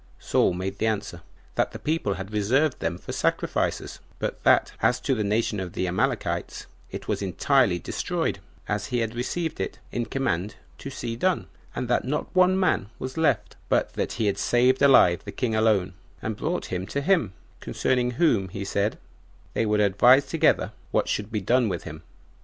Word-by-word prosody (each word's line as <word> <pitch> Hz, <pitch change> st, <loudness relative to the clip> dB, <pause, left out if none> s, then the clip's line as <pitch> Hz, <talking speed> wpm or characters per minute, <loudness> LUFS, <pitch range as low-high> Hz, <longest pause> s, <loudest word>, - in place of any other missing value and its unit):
Saul -, -, +2 dB
made 95 Hz, +2 st, -4 dB
answer, 105 Hz, -6 st, -1 dB, 0.3 s
That -, -, 0 dB
the -, -, -5 dB
people 150 Hz, -11 st, -1 dB
had 95 Hz, +2 st, -7 dB
reserved 130 Hz, +8 st, +2 dB
them 85 Hz, -, -2 dB
for -, -, -8 dB
sacrifices; -, -, -1 dB, 0.2 s
but -, -, -4 dB
that, -, -, +4 dB
as 125 Hz, -, +3 dB
to 135 Hz, -, +1 dB
the 110 Hz, -4 st, 0 dB
nation 105 Hz, 0 st, 0 dB
of 90 Hz, -2 st, -5 dB
the 95 Hz, -, -1 dB
Amalekites, 90 Hz, +1 st, -1 dB, 0.2 s
it -, -, -7 dB
was -, -, -1 dB
entirely 100 Hz, +2 st, +2 dB
destroyed, 85 Hz, -, -2 dB, 0.3 s
as -, -, -2 dB
he 125 Hz, -, -1 dB
had 115 Hz, -1 st, -1 dB
received 160 Hz, +7 st, -3 dB
it -, -, -3 dB
in 120 Hz, -1 st, -2 dB
command 100 Hz, -7 st, -1 dB, 0.2 s
to -, -, -6 dB
see 120 Hz, -3 st, -4 dB
done, 185 Hz, +9 st, 0 dB, 0.3 s
and 125 Hz, -, -2 dB
that 120 Hz, -, +1 dB
no 145 Hz, +4 st, -2 dB
one 185 Hz, +1 st, +4 dB
man 170 Hz, -, +1 dB
was 130 Hz, 0 st, -6 dB
left; 160 Hz, -1 st, 0 dB
but -, -, +1 dB
that -, -, -2 dB
he 110 Hz, -, -1 dB
had 100 Hz, -1 st, 0 dB
saved 125 Hz, +2 st, +3 dB
alive 130 Hz, -11 st, +6 dB
the -, -, -7 dB
king 120 Hz, -3 st, -2 dB
alone, 110 Hz, -4 st, +2 dB, 0.3 s
and 110 Hz, -1 st, -3 dB
brought 160 Hz, -, -3 dB
him 90 Hz, +1 st, -3 dB
to 140 Hz, -, -2 dB
him, 140 Hz, -, +2 dB, 0.3 s
concerning 125 Hz, -1 st, 0 dB
whom, 110 Hz, -, +2 dB
he 100 Hz, +2 st, -5 dB
said, 100 Hz, +2 st, 0 dB, 0.6 s
they 115 Hz, -, 0 dB
would 105 Hz, 0 st, +2 dB
advise 120 Hz, +7 st, +5 dB
together 135 Hz, -, +2 dB, 0.2 s
what -, -, +1 dB
should 105 Hz, +1 st, -2 dB
be 105 Hz, -2 st, -1 dB
done 120 Hz, +3 st, +2 dB
with 90 Hz, -3 st, -3 dB
him. 80 Hz, -1 st, -8 dB
110 Hz, 185 wpm, -25 LUFS, 100-130 Hz, 0.6 s, alive